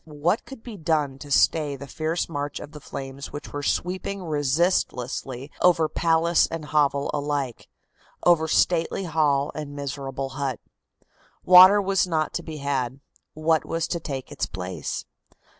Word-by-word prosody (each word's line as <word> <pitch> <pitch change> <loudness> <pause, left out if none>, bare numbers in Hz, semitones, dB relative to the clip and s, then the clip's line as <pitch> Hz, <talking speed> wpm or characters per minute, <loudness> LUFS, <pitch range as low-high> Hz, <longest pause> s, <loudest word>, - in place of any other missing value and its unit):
What 160 +7 -1
could 270 -4 -11
be 230 -4 -8
done 150 -5 0
to 145 - -10
stay 145 +1 +3
the 140 +1 -8
fierce 160 +4 -2
march 145 -2 -4
of 145 - -9
the 150 - -10
flames 135 -1 -7
which 145 - -8
were 145 - -3
sweeping 185 +5 -2
resistlessly 145 -4 -1
over 170 -3 +4
palace 165 +1 +2
and 165 -2 -5
hovel 145 -2 +1
alike, 145 -4 -2 0.6
over 165 -2 +4
stately 170 +3 +2
hall 150 -4 +1
and 145 -2 -6
miserable 135 -1 -4
hut? 135 0 -3 0.9
Water 185 +3 +9
was 195 -1 +1
not 155 -3 -1
to - - -2
be 160 -2 -7
had; 135 -2 -2 0.4
what 155 0 +2
was 165 -1 -2
to 170 - -1
take 135 -5 -6
its - - -2
place? 90 -1 -5
150 Hz, 150 wpm, -25 LUFS, 140-165 Hz, 0.9 s, Water